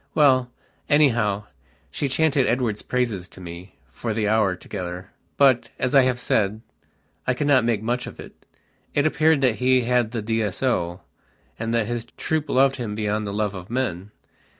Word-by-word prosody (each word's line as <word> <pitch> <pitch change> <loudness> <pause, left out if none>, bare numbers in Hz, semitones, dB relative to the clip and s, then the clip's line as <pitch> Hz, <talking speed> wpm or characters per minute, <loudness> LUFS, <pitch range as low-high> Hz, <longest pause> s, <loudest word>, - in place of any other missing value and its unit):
Well, 130 -4 +4 0.4
anyhow, 115 -9 +3 0.5
she 145 - -2
chanted 145 -1 +2
Edward's 115 -4 0
praises 115 -8 -2
to - - -16
me 90 +1 -10 0.2
for 115 -3 -4
the 105 -2 0
hour 105 -3 +2
together, 90 0 -7 0.3
but, 135 -4 +4
as 130 +1 -1
I 135 - +8
have 130 -1 +1
said, 105 -2 0 0.7
I 125 - +2
could 145 - -2
not 135 -4 +4
make 115 -3 0
much 120 +2 -1
of - - -10
it. - - -13 0.5
It 145 - +2
appeared 155 -1 +3
that 125 -5 +2
he 130 0 +3
had 120 -1 +1
the 115 -2 -4
D.S.O., 105 -4 -1 0.6
and 115 0 -2
that 115 -2 +2
his 120 0 -3
troop 160 -1 -1
loved 135 +1 +3
him 110 -5 -4
beyond 105 0 -1
the - - -3
love 105 0 -1
of 90 -2 -9
men. 105 -7 -2
115 Hz, 175 wpm, -23 LUFS, 105-130 Hz, 0.7 s, I